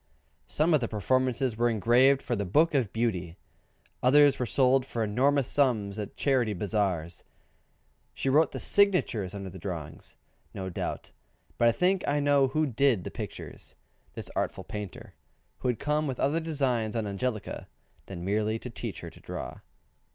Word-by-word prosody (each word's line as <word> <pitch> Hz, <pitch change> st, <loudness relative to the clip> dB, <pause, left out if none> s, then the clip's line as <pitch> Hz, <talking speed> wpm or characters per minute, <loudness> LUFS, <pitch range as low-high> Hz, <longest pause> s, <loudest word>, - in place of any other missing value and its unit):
Some 160 Hz, +3 st, +2 dB
of 155 Hz, -, +5 dB
the 120 Hz, -, -2 dB
performances 130 Hz, +3 st, 0 dB
were 120 Hz, +1 st, +2 dB
engraved 120 Hz, +5 st, +4 dB
for 120 Hz, -, -1 dB
the 100 Hz, -, -2 dB
"Book 155 Hz, -, +3 dB
of 125 Hz, -8 st, +1 dB
Beauty:" 95 Hz, -7 st, -2 dB, 0.6 s
others 145 Hz, +2 st, +5 dB
were 125 Hz, -, -1 dB
sold 130 Hz, +2 st, +3 dB
for 120 Hz, -3 st, -3 dB
enormous 130 Hz, +5 st, +2 dB
sums 110 Hz, -8 st, +1 dB
at 105 Hz, -, -6 dB
Charity 125 Hz, -6 st, +1 dB
Bazaars. 90 Hz, -4 st, -2 dB, 0.9 s
She -, -, -3 dB
wrote 150 Hz, +4 st, +4 dB
the -, -, -5 dB
signatures 180 Hz, -, +2 dB
under 95 Hz, -2 st, -6 dB
the 95 Hz, -, -10 dB
drawing 85 Hz, -5 st, -6 dB, 0.5 s
no 95 Hz, -1 st, -4 dB
doubt, -, -, -5 dB, 0.5 s
but 120 Hz, -, +5 dB
I -, -, +6 dB
think 185 Hz, +9 st, +1 dB
I 145 Hz, +1 st, +2 dB
know 145 Hz, -1 st, +3 dB
who 155 Hz, +4 st, +1 dB
did 130 Hz, -6 st, +2 dB
the -, -, -6 dB
pictures -, -, -8 dB, 0.4 s
this -, -, -5 dB
artful -, -, -2 dB
painter, 105 Hz, -3 st, -8 dB, 0.5 s
who -, -, -2 dB
had 125 Hz, -2 st, +1 dB
come 150 Hz, +1 st, 0 dB
with 130 Hz, -2 st, -4 dB
other 145 Hz, +4 st, +1 dB
designs 130 Hz, -9 st, -1 dB
on 115 Hz, -2 st, -1 dB
Angelica 105 Hz, +1 st, -4 dB, 0.4 s
than 90 Hz, -2 st, -7 dB
merely 105 Hz, +2 st, 0 dB
to 125 Hz, +2 st, -8 dB
teach -, -, -6 dB
her -, -, -8 dB
to -, -, -16 dB
draw. -, -, -7 dB
120 Hz, 165 wpm, -28 LUFS, 105-140 Hz, 0.9 s, I